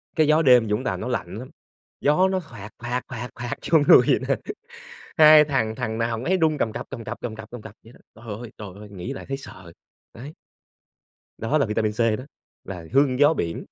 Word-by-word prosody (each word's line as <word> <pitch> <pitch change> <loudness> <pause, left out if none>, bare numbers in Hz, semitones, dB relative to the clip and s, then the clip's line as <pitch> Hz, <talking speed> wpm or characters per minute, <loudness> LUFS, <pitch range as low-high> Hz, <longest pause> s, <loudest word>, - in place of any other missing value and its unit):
Cái 155 -2 +3
gió 155 +1 +4
đêm 125 -6 +5
Vũng 105 +4 -1
Tàu - - -2
nó - - -5
lạnh - - -3
lắm, - - -8 0.5
gió 150 +6 +3
nó 190 0 0
phạt 115 - -11
phạt 120 +1 -2
phạt 120 0 -6
phạt 120 0 -4 0.2
vô 160 - +7
người - - +9
vậy - - +3
nè, 135 - +2 0.8
hai 155 -2 +8
thằng 125 -7 -1
thằng 110 0 -3
nào 115 - 0
thằng 115 - -6
nấy 190 +5 +2
run 160 -4 +1
cầm 110 - -1
cập, - - -6
cầm 115 - -7
cập, 115 +1 -6
cầm 115 -3 -5
cập, 110 0 -11
cầm 120 -2 -9
cập 105 - -11
vậy 115 - -15
đó. - - -20
Trời 110 -1 -8
ơi, 120 - -9
trời 105 - -7
ơi, 105 +1 -11
nghĩ 100 +6 -6
lại - - -8
thấy 135 - -2
sợ, 90 -10 -12 0.4
đấy. 135 +7 -9 1.1
Đó 115 +7 0
là 140 - +2
vitamin 105 0 -1
C 105 - -13 0.2
đó, 130 - -8 0.4
là 90 -4 -8
hương 135 -2 +3
gió 145 +2 +5
biển. 85 - -4
120 Hz, 230 wpm, -23 LUFS, 110-145 Hz, 1.1 s, người